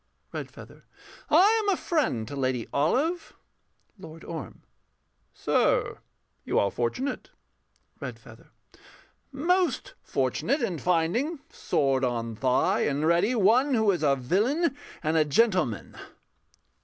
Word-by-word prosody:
REDFEATHER. - - -9 0.5
I 405 +9 +5
am 410 - -1
a 380 - +2
friend 265 - -1
to 145 - -7
Lady 130 -3 -1
Olive. 285 - 0 0.7
LORD 165 -3 -11
ORM. 160 - -8 0.7
Sir, - - +1 0.4
you - - -1
are 100 - +2
fortunate. 125 - -3 0.7
REDFEATHER. - - -10 0.8
Most 350 +6 0
fortunate 280 -2 -1
In 180 -8 -2
finding, 180 - 0
sword 135 -2 0
on 115 -2 -2
thigh 125 +3 +1
and 145 +2 0
ready, 170 +9 +2
one 245 +6 +3
Who 220 -3 +3
is 180 - -2
a 140 -3 +3
villain 230 - 0 0.3
and 155 +1 +1
a 155 - +5
gentleman. 155 - +1
175 Hz, 115 wpm, -27 LUFS, -, 0.8 s, I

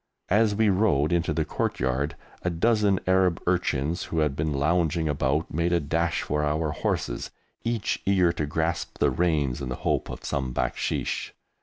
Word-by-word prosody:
As 105 +1 +3
we 110 0 +3
rode 90 -6 +2
into 85 -1 +1
the - - 0
courtyard 65 +5 -1 0.3
a 90 - 0
dozen 100 +2 +2
Arab 95 -1 +3
urchins 85 -2 0
who 80 - -4
had 75 -3 +1
been 75 +1 -1
lounging 80 +3 +1
about 75 +2 0
made 85 +3 +1
a 85 - +3
dash 80 +3 0
for 75 0 -1
our 75 +1 0
horses, - - -2 0.3
each 115 -3 -1
eager 95 -3 +3
to 75 -3 -2
grasp 80 +3 -2
the - - +3
reins 75 -7 0
in 65 - -4
the 65 - -2
hope - - +1
of - - -7
some 65 -3 -2
"baksheesh." - - -2
80 Hz, 170 wpm, -26 LUFS, 75-90 Hz, 0.3 s, As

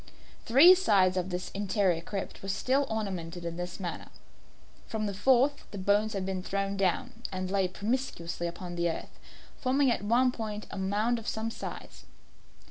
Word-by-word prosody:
Three 275 +10 +9
sides 200 - +3
of 185 0 -1
this 180 0 -4
interior 195 -3 +1
crypt 195 +3 -5
were 195 - -6
still 265 +7 +1
ornamented 180 -6 -4
in 170 0 -3
this 175 +2 -5
manner. 175 -3 -5 0.8
From 220 -1 -2
the 200 - -2
fourth 265 +7 +3
side - - -20
the 205 - -8
bones 205 +3 +2
had 195 -2 -2
been 190 -1 -2
thrown 195 +1 -2
down, 230 +5 -1
and 185 0 -3
lay 195 -2 +2
promiscuously 185 -5 -3
upon 175 +1 -6
the 170 0 +1
earth, 165 - -6 0.4
forming 265 0 +3
at - - 0
one 240 +5 +3
point 215 -3 -5
a - - -6
mound 210 +5 +1
of 225 - -10
some 220 +1 -2
size. - - -8
200 Hz, 175 wpm, -29 LUFS, 185-230 Hz, 0.8 s, Three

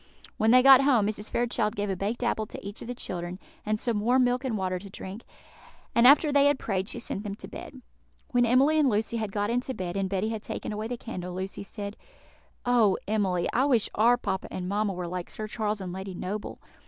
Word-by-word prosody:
When 220 - +2
they 250 +2 +7
got 270 -1 +9
home, 260 -7 +4
Mrs. 210 0 -3
Fairchild 235 -2 0
gave 205 -1 -1
a - - -1
baked 205 +6 -3
apple 220 -2 0
to - - -9
each 205 - -7
of - - -8
the 245 - -4
children, 175 -5 -5 0.3
and 215 0 -1
some 230 -3 0
warm 250 +4 +3
milk 250 +1 +1
and 245 -5 -1
water 185 -1 -1
to 200 +2 -11
drink; 195 +3 -8 0.7
and 235 +1 +6
after 295 +2 +6
they 285 0 +5
had 285 -1 +3
prayed, 195 -4 -2
she - - -6
sent 235 -4 -3
them 200 -2 -4
to - - -9
bed. 260 -3 -10 0.5
When 245 -1 +3
Emily 265 +6 +4
and 290 -3 +4
Lucy 220 +1 0
had 215 -3 -3
got 205 +2 -1
into 250 +2 -1
bed, 180 -1 -4
and 195 -1 -1
Betty 195 +2 -1
had 220 -1 -4
taken - - -5
away 215 +1 -3
the 245 +1 -4
candle, 180 -7 -6
Lucy 190 +1 -4
said, 200 0 -7 0.7
"Oh, 235 -6 +4
Emily! 195 -5 +1
I 255 +3 +3
wish 245 -7 +3
our 235 +3 +4
papa 195 -5 -3
and 180 -1 -5
mamma 205 +1 0
were 180 -1 -4
like 180 0 -5
Sir 215 - -6
Charles 215 -2 -2
and 180 -2 -5
Lady 190 0 -6
Noble. 200 +4 -5
215 Hz, 230 wpm, -27 LUFS, 195-245 Hz, 0.7 s, got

